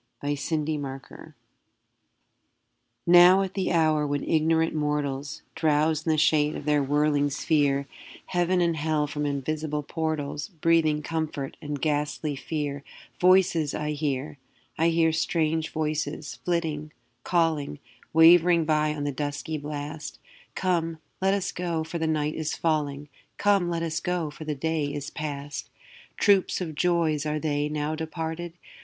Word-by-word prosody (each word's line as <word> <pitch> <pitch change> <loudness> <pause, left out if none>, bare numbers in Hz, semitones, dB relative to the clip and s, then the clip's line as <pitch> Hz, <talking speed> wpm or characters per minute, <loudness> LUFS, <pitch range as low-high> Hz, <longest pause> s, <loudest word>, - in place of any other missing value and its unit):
TWILIGHT 150 +1 -1
VOICES 135 +3 -8 1.7
Now, 175 +2 +7
at 190 -1 -5
the 190 -2 -1
hour 155 -3 +2
when 145 0 -1
ignorant 160 0 +2
mortals 150 -1 -2
Drowse 155 0 +1
in - - +4
the 155 - +2
shade 150 -1 +3
of - - -7
their 150 -1 +3
whirling 145 +1 +2
sphere, 140 -2 +1 0.4
Heaven 180 0 +1
and 170 -2 +1
Hell 155 0 +1
from 145 0 -3
invisible 150 +2 -2
portals 150 -1 -3
Breathing 160 -3 +2
comfort 155 -4 -3
and 145 -2 -4
ghastly 150 0 -1
fear, 145 0 -4 0.4
Voices 180 -5 +4
I 150 0 -2
hear; 145 -1 -3 0.4
I 165 +3 +3
hear 165 -1 +3
strange 160 0 0
voices, 155 -1 -3
flitting, 155 -3 -2 0.3
calling, 160 - 0 0.3
Wavering 170 +1 +6
by 155 -1 +1
on 145 - -4
the 145 - -1
dusky 145 +2 -3
blast, 145 +1 -6 0.4
'Come, 165 -3 0 0.2
let 195 +1 +3
us 190 -2 -2
go, 170 -3 -2
for 165 +1 -5
the 160 - 0
night 155 -1 0
is 155 -1 -3
falling; 145 -3 -1 0.3
Come, 200 -4 +3
let 170 -1 -1
us 160 -1 -1
go, 175 -4 -2
for 155 +1 -9
the 150 -1 -2
day 160 +1 -1
is 145 0 -5
past!' 145 -2 -5 0.5
Troops 200 -2 +3
of 170 -4 -4
joys 165 -2 +1
are 155 0 -1
they, 150 -1 -1
now 150 0 -2
departed? 160 +1 -4
155 Hz, 140 wpm, -26 LUFS, 145-165 Hz, 1.7 s, Now